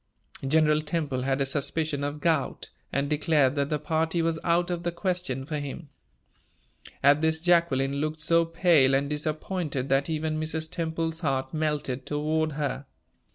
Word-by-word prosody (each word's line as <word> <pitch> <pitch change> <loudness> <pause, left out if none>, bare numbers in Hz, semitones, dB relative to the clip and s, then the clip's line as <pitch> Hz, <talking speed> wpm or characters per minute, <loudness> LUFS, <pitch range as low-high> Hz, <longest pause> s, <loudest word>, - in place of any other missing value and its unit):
General 155 +1 +3
Temple 150 -4 -2
had 135 +1 0
a - - +2
suspicion 145 +1 -1
of 145 +1 -3
gout, 160 -5 0 0.2
and 140 +1 0
declared 150 -2 +2
that 140 -1 -1
the 150 - +1
party 160 +2 0
was 165 -1 0
out 175 +1 +2
of 175 -1 -2
the 175 0 -1
question 170 -7 -2
for 150 +1 -3
him. 145 +2 -7 1.1
At 145 +2 +5
this, 160 0 +2
Jacqueline 160 -6 +2
looked 155 +1 -2
so 165 +2 +4
pale 165 -5 +4
and 140 +1 +1
disappointed 150 -2 -2
that 135 +3 +2
even 155 0 -1
Mrs. 160 0 -3
Temple's 165 -1 -2
heart 135 -3 -1
melted 150 -4 -2
toward 155 +1 0
her. 145 -1 -3
155 Hz, 155 wpm, -27 LUFS, 140-165 Hz, 1.1 s, At